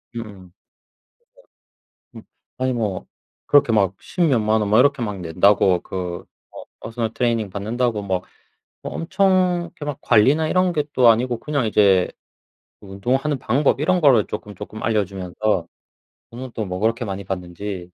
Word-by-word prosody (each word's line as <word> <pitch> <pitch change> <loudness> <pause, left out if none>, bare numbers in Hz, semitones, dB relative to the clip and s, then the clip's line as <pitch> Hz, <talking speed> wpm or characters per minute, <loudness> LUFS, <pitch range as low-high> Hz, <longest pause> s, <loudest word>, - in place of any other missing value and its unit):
음음. 115 - -3
그러니까 95 -4 -13 1.6
음. - - -9 0.4
아니 130 0 0
뭐 105 -6 -3 0.4
그렇게 145 -5 +4
막 100 -3 +2
10 180 - -5
몇만 110 -8 +2
원 100 - -1
뭐 110 +3 +5
이렇게 140 -1 +3
막 105 -4 -3
낸다고 90 +2 +3
그 90 -2 -5 0.3
어 - - -9 0.2
퍼스널 115 -1 -4
트레이닝 115 -4 0
받는다고 110 +3 -2
뭐 95 -2 -2 0.6
뭐 - - -6
엄청 185 -1 +1
그렇게 145 - -9
막 145 -2 -4
관리나 140 +9 +3
이런 185 -1 +2
게 150 -3 0
또 125 -2 +5
아니고 120 +1 +2
그냥 145 -5 -1
이제 100 -4 +3 0.7
운동하는 125 +9 -2
방법 135 +4 +1
이런 175 +4 +1
거를 130 -8 +5
쪼끔쪼끔 105 +1 -8
알려 110 -3 +1
주면서 95 -1 -2 0.6
돈은 125 +1 -8
또 110 - -3
뭐 90 0 -5
그렇게 115 +3 0
많이 100 -1 -5
받는지 95 +1 -5
110 Hz, 305 characters per minute, -21 LUFS, 100-130 Hz, 1.6 s, 뭐